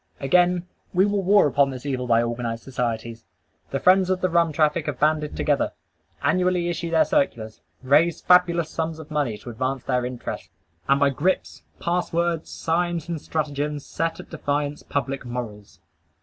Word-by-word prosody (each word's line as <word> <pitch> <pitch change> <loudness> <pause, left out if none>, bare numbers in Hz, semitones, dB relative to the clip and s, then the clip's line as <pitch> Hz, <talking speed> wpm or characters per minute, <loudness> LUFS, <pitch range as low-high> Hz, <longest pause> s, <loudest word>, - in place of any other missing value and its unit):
Again, 180 +5 +2 0.3
we 185 +2 +5
will 205 -1 0
war 200 +2 +5
upon 140 -1 +3
this 130 0 -7
evil 130 -3 -2
by 115 0 +4
organized 115 -1 -3
societies. 115 -3 -3 0.5
The 135 - -2
friends 185 +2 +4
of 185 -1 +1
the 185 -1 0
rum 170 -1 +3
traffic 155 +1 +1
have 145 -4 -3
banded 150 0 +1
together; 145 -2 +1 0.5
annually 180 +3 +2
issue 170 0 -3
their 165 -1 +4
circulars; 110 - -1 0.2
raise 150 +6 +3
fabulous 175 -2 +3
sums 160 -1 -3
of 160 0 -11
money 140 -8 -1
to 120 - -9
advance 130 +2 -2
their 125 -2 0
interests; 125 -1 -5 0.4
and 140 0 +4
by 140 0 +4
grips, 175 +8 -1 0.2
pass 175 +1 -1
words, 170 -1 0
signs, 170 0 -1
and 165 -3 -3
stratagems 150 -1 -3
set 165 0 -2
at - - -11
defiance 145 -2 -2
public 135 -1 -3
morals. 120 -5 -7
150 Hz, 165 wpm, -24 LUFS, 130-170 Hz, 0.5 s, we